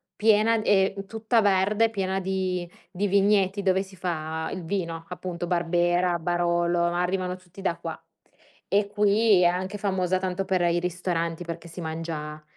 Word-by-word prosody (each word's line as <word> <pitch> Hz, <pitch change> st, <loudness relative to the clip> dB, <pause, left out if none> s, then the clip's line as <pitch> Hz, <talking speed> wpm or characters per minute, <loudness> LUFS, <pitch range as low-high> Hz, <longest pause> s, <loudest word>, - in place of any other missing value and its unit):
piena 220 Hz, +1 st, +3 dB
e 195 Hz, -2 st, +3 dB
tutta 225 Hz, +1 st, +1 dB
verde, 205 Hz, +3 st, +3 dB
piena 195 Hz, -3 st, -1 dB
di 185 Hz, -2 st, -2 dB, 0.2 s
di 200 Hz, +2 st, -1 dB
vigneti 200 Hz, 0 st, +2 dB
dove 190 Hz, 0 st, +3 dB
si 190 Hz, 0 st, -10 dB
fa 160 Hz, -3 st, -3 dB
il 185 Hz, -, -5 dB
vino, 165 Hz, -2 st, -3 dB
appunto 180 Hz, -1 st, -5 dB
Barbera, 175 Hz, 0 st, +1 dB
Barolo, 175 Hz, 0 st, +1 dB
arrivano 180 Hz, +1 st, 0 dB
tutti 185 Hz, +1 st, -17 dB
da 175 Hz, -3 st, 0 dB
qua. 165 Hz, -1 st, -6 dB, 0.7 s
E 200 Hz, +2 st, +2 dB
qui, 205 Hz, -1 st, +3 dB
è -, -, +5 dB
anche 185 Hz, +3 st, 0 dB
famosa 185 Hz, -2 st, 0 dB
tanto 185 Hz, +1 st, -2 dB
per 185 Hz, -2 st, +1 dB
i 175 Hz, 0 st, +2 dB
ristoranti, 175 Hz, -1 st, -2 dB
perché 170 Hz, 0 st, -7 dB
si 170 Hz, +2 st, -8 dB
mangia 160 Hz, -1 st, -5 dB
180 Hz, 155 wpm, -26 LUFS, 170-195 Hz, 0.7 s, è